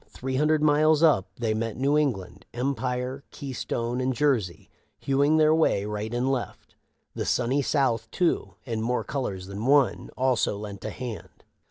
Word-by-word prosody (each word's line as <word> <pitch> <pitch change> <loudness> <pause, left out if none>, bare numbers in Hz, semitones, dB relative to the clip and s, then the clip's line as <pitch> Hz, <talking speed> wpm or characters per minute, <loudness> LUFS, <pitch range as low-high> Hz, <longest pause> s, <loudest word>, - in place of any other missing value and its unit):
Three 130 0 -4
hundred 150 +1 +2
miles 155 +1 +4
up 140 - +4
they 115 -1 -1
met 110 0 -3
New 140 +3 +2
England, 130 -12 -1
Empire, 125 +1 -2
Keystone, 125 -3 -3
and 130 0 0
Jersey, 120 -11 0 0.3
hewing 140 +3 +2
their 155 0 +5
way 155 -11 +2
right 105 +1 -4
and 125 +2 0
left. 130 -3 -4 0.4
The - - -3
Sunny 125 +3 +1
South 120 -6 0
too, 175 +6 0
in 115 -4 -3
more 125 +2 0
colors 100 -10 -4
than 100 +5 -5
one, 140 -2 +3
also 130 -5 +1
lent 100 -1 -8
a - - -2
hand. 120 -1 -8
125 Hz, 160 wpm, -26 LUFS, 110-140 Hz, 0.4 s, their